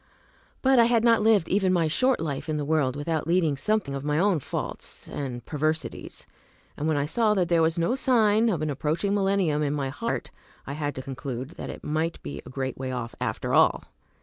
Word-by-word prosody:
But 265 -1 +5
I 230 - +7
had 230 -1 +3
not 230 -2 +5
lived 210 -5 +4
even 190 -1 +2
my 170 -3 +2
short 255 +12 +2
life 150 -1 -4
in 155 - 0
the 145 - -2
world 145 -4 +1
without 155 +2 -2
leading 165 -4 +2
something 185 +1 0
of 135 0 -4
my 150 0 0
own 185 -1 +3
faults - - -5
and 125 -4 -5
perversities; 155 +1 -3 0.5
and 150 - -2
when 155 -2 +1
I 140 - +1
saw 210 +7 +2
that 180 -3 +1
there 170 -1 +4
was 160 +1 +2
no 170 +7 +1
sign 230 -4 +3
of 170 -7 -1
an 155 - -1
approaching 160 +8 -1
millennium 195 -6 +1
in 145 -1 0
my 135 -2 -2
heart 140 - -3 0.3
I 140 - -5
had 145 -1 -3
to 130 - -5
conclude 130 0 -5
that - - -7
it - - -8
might 160 +2 -1
be 70 0 -6
a - - -11
great 130 0 -4
way 130 -1 -3
off, 120 -2 -4
after - - -2
all. - - +4
155 Hz, 215 wpm, -26 LUFS, 140-195 Hz, 0.5 s, I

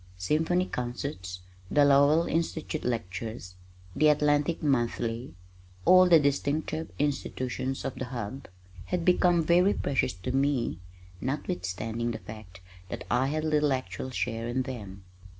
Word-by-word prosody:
Symphony 160 - +1
concerts, 120 - -5 0.3
the 145 -1 +4
Lowell 145 +4 +5
Institute 160 -1 -2
Lectures, 110 -3 -4 0.4
the 155 - +4
Atlantic 150 +2 +2
Monthly 120 - -1 0.5
(all 185 0 +7
the 165 -2 +8
distinctive 150 +2 -1
institutions 135 -2 -2
of - - -2
the 130 -1 -5
Hub) 125 +1 -6 0.4
had 180 -2 -2
become 180 -2 +4
very 180 +5 +4
precious 135 - 0
to 90 +2 -5
me 135 - 0 0.4
notwithstanding 115 -2 -3
the 115 - -3
fact 105 -3 -11 0.3
that - - -5
I 125 +2 +3
had 155 +2 -1
little 150 -2 +2
actual 130 0 -4
share 115 -2 -2
in 130 +2 0
them. 100 -7 -8
135 Hz, 130 wpm, -28 LUFS, 115-150 Hz, 0.5 s, the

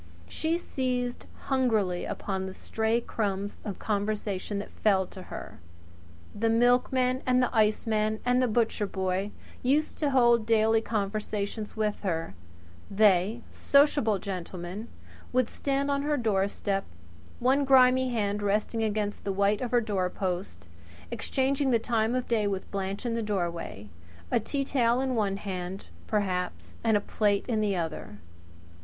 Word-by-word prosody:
She 320 - -1
seized 250 -6 -2
hungrily 220 -9 +1
upon 190 -1 -3
the 190 - -8
stray 225 +1 0
crumbs 200 -3 -3
of 200 -3 -5
conversation 205 -1 -2
that 200 - -5
fell 195 -3 +2
to 185 - -11
her. - - -9 0.7
The 225 +2 0
milkman 250 +2 +3
and 250 0 +4
the 250 -1 +1
iceman 215 0 +2
and 250 +1 +3
the 255 - +3
butcher 225 -2 +1
boy 190 +1 -1 0.3
used 290 +5 +1
to 295 - +1
hold 240 -4 +4
daily 225 0 +4
conversation 210 0 -2
with 215 -1 -1
her. 165 - -2 0.6
They 205 +2 +3
sociable 280 -7 +3
gentlemen 185 +2 -6 0.4
would 255 -2 +1
stand 280 0 -1
on 280 0 +1
her 295 +1 0
doorstep, 200 -3 0 0.6
one 265 +3 +3
grimy 260 -1 +5
hand 210 -3 -1
resting 210 +2 0
against 210 -1 -1
the 200 - -1
white 200 +1 +2
of 250 - -2
her 240 0 +3
doorpost, 185 - -2 0.4
exchanging 270 +3 0
the 240 - +4
time 225 0 0
of 255 - -1
day 220 -3 +1
with 195 -1 -3
Blanche 195 +2 -3
in 235 - 0
the 230 - -1
doorway 175 - -3 0.4
a - - +4
tea 275 +5 -2
towel 245 -3 +2
in 260 -1 0
one 205 -4 0
hand, 190 -1 -5 0.2
perhaps, 185 -4 -2
and 220 -2 +4
a - - -2
plate 205 -1 +1
in 225 -3 +1
the 205 -2 +1
other. 165 - -4
215 Hz, 145 wpm, -28 LUFS, 195-245 Hz, 0.7 s, grimy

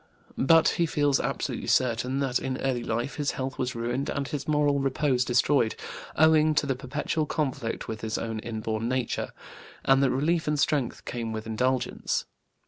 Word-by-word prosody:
But 165 +4 +5
he 170 - +1
feels 145 -2 +2
absolutely - - -2
certain 125 +1 +1
that 130 -3 +1
in 130 -1 -3
early 130 -3 0
life 120 +4 -2
his 145 -2 0
health 130 0 -4
was 125 -1 -1
ruined 120 +4 -2
and 140 -1 -2
his 145 -1 -4
moral 145 -2 +2
repose 135 -1 +1
destroyed 125 -1 +2 0.4
owing 155 0 +5
to 150 - +2
the 135 -2 0
perpetual 150 +4 -2
conflict 140 -7 -2
with 110 -1 -5
his 110 -1 -2
own 115 -1 -3
inborn 110 0 -3
nature, 130 -2 -1 0.5
and 135 0 +5
that 135 - +4
relief 155 +6 +1
and 150 -1 +1
strength 140 -5 0
came 115 -2 -4
with 110 0 -4
indulgence. 125 +3 -1
130 Hz, 170 wpm, -27 LUFS, 120-145 Hz, 0.5 s, But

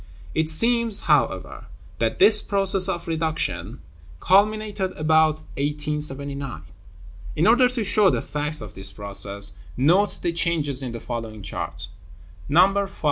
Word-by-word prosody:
It 160 0 0
seems, 230 +5 +3
however, 140 - 0 0.3
that 115 -1 -1
this 210 +2 +5
process 195 -1 +2
of 170 -2 -4
reduction 155 - -3 0.4
culminated 205 - +1
about 155 0 +2 0.2
1879. 145 -2 -3 0.7
In 160 - +1
order 245 +3 +5
to 250 -3 -2
show 205 -1 +4
the - - -1
facts 150 +1 -3
of 105 -3 -9
this 95 0 -4
process, 100 0 -2 0.2
note 175 +10 +2
the 170 - 0
changes 155 -5 0
in 130 -2 -4
the 115 - -6
following 115 -4 -6
chart, 85 -2 -5 0.6
No. 195 +5 +3
V. - - -16
155 Hz, 135 wpm, -23 LUFS, 125-195 Hz, 0.7 s, this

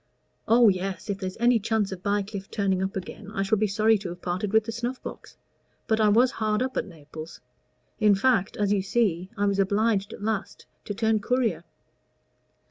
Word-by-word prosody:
"Oh, 235 +1 +6
yes. 190 0 -1
If 195 - -4
there's 185 -1 -5
any 240 0 +4
chance 220 -1 0
of 185 -2 -6
Bycliffe 200 0 -2
turning 195 -3 0
up 190 0 -2
again, 195 +2 -7
I 195 - +1
shall 210 +1 +1
be 215 - +2
sorry 215 +2 +3
to 190 -2 -6
have 175 +1 -8
parted 185 +3 -2
with 220 0 +4
the 225 - -5
snuff 240 +3 -3
box; - - -9 0.5
but 220 0 +1
I 215 - +5
was 240 +5 +4
hard 215 +1 0
up 260 0 -4
at - - -1
Naples. 155 -2 -10 0.6
In 210 -2 +5
fact, 220 -2 +1
as 205 -1 +1
you 200 - +1
see, 190 -3 0
I 205 - +1
was 200 -1 +1
obliged 200 +1 +1
at - - -9
last 215 -2 -3 0.2
to 205 - -4
turn 220 0 +2
courier." 220 -7 0
205 Hz, 200 wpm, -26 LUFS, 190-220 Hz, 0.6 s, Oh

